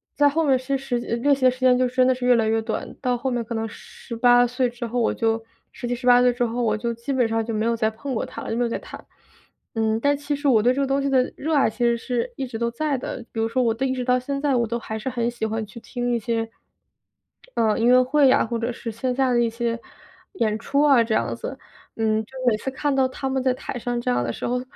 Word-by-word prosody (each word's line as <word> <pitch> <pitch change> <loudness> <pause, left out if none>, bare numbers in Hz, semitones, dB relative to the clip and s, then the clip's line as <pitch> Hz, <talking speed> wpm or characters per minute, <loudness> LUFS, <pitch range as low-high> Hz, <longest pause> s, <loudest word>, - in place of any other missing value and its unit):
在 290 0 +5
后 325 +3 0
面 265 -2 +4
其 265 +2 -2
实 265 -2 -2
练 240 +5 +1
习 260 -1 -1
的 255 - +6
时 255 - -10
间 255 -1 +4
就 255 - +2
真 255 +1 +2
的 260 - +3
是 250 0 -4
越 250 - +6
来 225 -1 +2
越 225 0 +2
短， 220 0 -4
到 250 -2 +1
后 265 +2 -2
面 240 -1 -1
可 235 - -5
能 225 0 -2
18 245 +3 +1
岁 250 +1 0
之 240 0 -6
后， 245 +2 -2
我 230 - +2
就 225 0 0 0.3
17、18 245 0 +2
岁 250 -1 +4
之 245 - -1
后， 235 +1 -2
我 215 -2 +2
就 235 +1 -2
基 235 +4 -4
本 245 -3 +2
上 225 0 -1
就 230 - -3
没 215 0 0
有 230 0 +1
再 220 -1 +1
碰 260 +4 -5
过 - - -1
它 - - -8
了， - - -6
就 225 - -1
没 245 - +2
有 235 - 0
再 - - -3
弹。 - - -11 0.7
嗯， 220 0 +1
但 285 +2 +2
其 290 0 -2
实 285 0 -2
我 220 -5 +4
对 250 - +4
这 275 - -1
个 275 - +1
东 275 +1 +1
西 275 - -1
的 260 -1 +2
热 315 +1 -1
爱 275 - +4
其 240 +2 -2
实 235 - +3
是 245 0 -3
一 265 -1 -4
直 235 - -6
都 235 0 0
在 285 +3 -1
的， 250 0 -6
比 225 - -5
如 225 - +1
说 255 +2 +1
我 230 - +2
的 265 +3 -1
一 260 - 0
直 255 -1 -3
到 250 0 +3
现 275 +2 -4
在 285 -3 +2
我 235 - +2
都 235 +2 -2
还 220 -1 -5
是 215 - -8
很 240 -2 -1
喜 240 -2 -3
欢 220 0 -2
去 215 +3 -11
听 245 +1 -3
一 235 - +1
些， 225 0 -2 1.1
嗯， 220 -1 +2
音 230 - +2
乐 250 +1 +7
会 280 +2 +4
呀， 255 - +4
或 230 +1 -3
者 230 +2 -1
是 230 -1 -6
线 250 +3 -2
下 265 -1 +2
的 240 - +3
一 235 - +2
些 230 0 -2 0.5
演 220 - 0
出 280 +5 0
啊， 275 -5 +6
这 225 -1 -1
样 115 0 0
子。 265 - -6 0.4
嗯， 220 -1 +1
就 - - -27 0.2
每 220 - +5
次 265 - -4
看 285 +2 -1
到 265 -1 +3
他 265 +1 -4
们 265 0 0
在 255 -1 +2
台 250 0 -6
上 240 +1 -2
这 235 - 0
样 125 0 +1
的 120 - -2
时 - - -5
候， 250 +1 0
245 Hz, 305 characters per minute, -23 LUFS, 230-260 Hz, 1.1 s, 乐